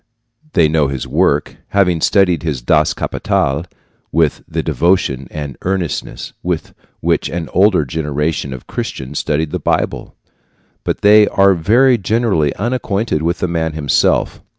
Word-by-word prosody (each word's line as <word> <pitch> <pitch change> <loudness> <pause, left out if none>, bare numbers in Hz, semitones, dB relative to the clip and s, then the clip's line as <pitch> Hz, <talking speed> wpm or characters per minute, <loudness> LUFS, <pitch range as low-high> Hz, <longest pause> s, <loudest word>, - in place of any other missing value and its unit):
They 85 -3 +4
know 75 -2 +2
his 70 -1 -4
work, - - +1
having 90 -5 +1
studied 90 -4 +3
his 75 -6 -2
Das 75 +4 +3
Kapital 70 +5 -1 0.5
with 80 -3 +1
the - - -3
devotion 85 -8 +1
and 75 -3 -6
earnestness 95 -4 -3
with - - -3 0.3
which - - 0
an 85 -1 -4
older 95 -4 +4
generation 75 0 -2
of 65 -2 -8
Christians 65 +3 -5
studied 75 0 -1
the - - -2
Bible, - - -2 0.7
but - - -2
they 105 0 +6
are 100 0 +4
very 120 +9 +3
generally 100 - +1
unacquainted 110 -5 -1
with 85 +2 -1
the - - +1
man 80 -2 -2
himself. 75 -3 +1
80 Hz, 140 wpm, -16 LUFS, 75-95 Hz, 0.7 s, they